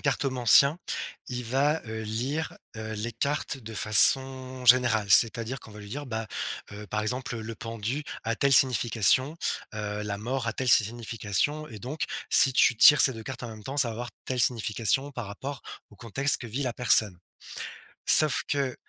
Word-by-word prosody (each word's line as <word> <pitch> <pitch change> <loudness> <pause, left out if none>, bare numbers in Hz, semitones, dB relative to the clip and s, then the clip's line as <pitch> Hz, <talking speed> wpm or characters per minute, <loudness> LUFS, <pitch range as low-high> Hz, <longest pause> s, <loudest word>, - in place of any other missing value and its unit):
cartomancien, 135 +3 +2 0.5
il 125 -1 -5
va, 140 +6 0
heu, 110 0 -6
lire, 125 +9 -4 0.2
heu, 110 0 -7
les 110 +3 -5
cartes 140 +4 -3
de 115 -3 -11
façon 130 +5 +4
générale. 120 -4 +3
C'est-à-dire 115 +3 +2
qu'on - - -15
va 105 - -12
lui 100 -1 -12
dire: 145 +4 -7
«Bah, 110 -2 -5 0.5
heu, 105 +1 -10
par 105 +1 -3
exemple 125 +2 -4
le 110 +1 -7
pendu 115 +5 -5 0.2
a 115 - -2
telle 140 +4 0
signification, 130 +2 +3 0.4
heu, 105 0 -5
la 105 -1 -4
mort 125 +3 -4
a 115 - -2
telle 130 - -3
signification 115 +6 -1
et 110 -3 -11
donc 135 +9 -5 0.3
si 135 - +7
tu 120 - +3
tires 145 +6 +7
ces 130 - +6
2 110 -2 -10
cartes 130 +1 -8
en 120 - -6
même 110 -1 -12
temps, 135 +5 -7
ça 130 -5 +2
va - - -5
avoir 120 +1 -7
telle 130 -1 -3
signification 120 +4 -1
par 120 -4 -7
rapport 135 +8 -8 0.3
au 105 - -18
contexte 135 +7 0
que 120 - -8
vit 120 +5 -5
la 125 -3 -3
personne». 110 -6 +1 0.9
Sauf 155 -3 +7
que, 140 -3 -2
120 Hz, 180 wpm, -26 LUFS, 110-135 Hz, 0.9 s, si